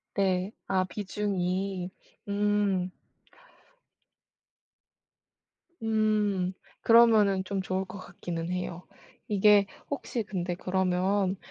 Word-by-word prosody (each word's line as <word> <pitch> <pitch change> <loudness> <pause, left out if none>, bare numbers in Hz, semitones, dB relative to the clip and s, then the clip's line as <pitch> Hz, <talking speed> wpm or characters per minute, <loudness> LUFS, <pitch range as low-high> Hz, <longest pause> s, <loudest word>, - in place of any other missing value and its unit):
네. 190 -1 +1 0.2
아 190 -1 +2
비중이. 190 -1 -2 0.4
음. 200 -3 +1 2.9
음. 210 -4 +1 0.3
그러면은 220 -5 +5
좀 195 0 -2
좋을 190 0 -2
것 195 - -9
같기는 175 -1 -5
해요. 180 -1 -4 0.4
이게 205 0 +5 0.2
혹시 250 -5 -3
근데 180 -3 -3
그러면 190 +1 +1
195 Hz, 150 characters per minute, -28 LUFS, 185-205 Hz, 2.9 s, 그러면은